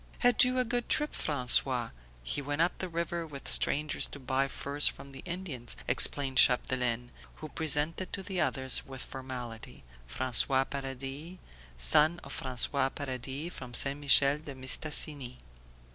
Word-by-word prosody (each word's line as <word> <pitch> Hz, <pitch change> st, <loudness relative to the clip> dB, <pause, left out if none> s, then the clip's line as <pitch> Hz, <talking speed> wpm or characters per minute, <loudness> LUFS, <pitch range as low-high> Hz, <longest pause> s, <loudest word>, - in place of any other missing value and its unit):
"Had 245 Hz, -2 st, +4 dB
you 250 Hz, 0 st, +1 dB
a 255 Hz, -, +1 dB
good 240 Hz, 0 st, -3 dB
trip, 300 Hz, 0 st, -1 dB
François? 125 Hz, -3 st, +3 dB, 0.3 s
He -, -, -3 dB
went 145 Hz, +2 st, -4 dB
up 170 Hz, +2 st, +1 dB
the 185 Hz, -, -4 dB
river 170 Hz, 0 st, -4 dB
with 140 Hz, -3 st, -10 dB
strangers 150 Hz, +1 st, +2 dB
to 145 Hz, -, -11 dB
buy 130 Hz, +1 st, -1 dB
furs 140 Hz, +2 st, 0 dB
from 140 Hz, -, -5 dB
the 135 Hz, -1 st, -11 dB
Indians," 170 Hz, -10 st, -5 dB
explained 135 Hz, -2 st, +3 dB
Chapdelaine; 125 Hz, -1 st, +1 dB, 0.2 s
who 155 Hz, -, -10 dB
presented 160 Hz, +4 st, 0 dB
to 195 Hz, -, -5 dB
the 190 Hz, -2 st, -3 dB
others 130 Hz, -1 st, 0 dB
with 135 Hz, -1 st, -8 dB
formality 125 Hz, -, -9 dB, 0.3 s
"François 130 Hz, -, +2 dB
Paradis, 135 Hz, +5 st, -6 dB, 0.4 s
son 150 Hz, -, +2 dB
of -, -, -8 dB
François 130 Hz, +1 st, +1 dB
Paradis 135 Hz, +4 st, -5 dB
from 125 Hz, -2 st, -6 dB
St. 140 Hz, +4 st, +1 dB
Michel 140 Hz, 0 st, +5 dB
de 145 Hz, -3 st, -10 dB
Mistassini." 130 Hz, -1 st, +1 dB
140 Hz, 145 wpm, -29 LUFS, 130-155 Hz, 0.4 s, Michel